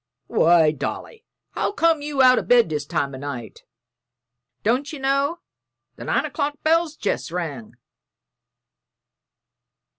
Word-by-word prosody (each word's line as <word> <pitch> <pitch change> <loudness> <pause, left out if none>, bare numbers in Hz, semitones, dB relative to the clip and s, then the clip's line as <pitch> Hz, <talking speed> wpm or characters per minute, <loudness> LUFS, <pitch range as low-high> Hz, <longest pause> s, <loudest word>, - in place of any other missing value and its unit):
"Why, 165 +2 +4
Dolly, 445 - -6 0.3
how - - -2
came 330 -5 +2
you 290 -2 +1
out 255 0 +6
o' - - -2
bed 240 -7 +4
this 150 -2 -3
time 140 -1 -2
o' 130 - -7
night? 130 -5 -7 1.0
Don't 255 +8 0
ye 310 - -6
know 275 +5 0 0.5
the - - -9
nine - - 0
o'clock 290 -1 -2
bell's 325 0 +2
jest 205 - -2
rung?" 150 -10 -5
255 Hz, 125 wpm, -22 LUFS, -, 1.0 s, out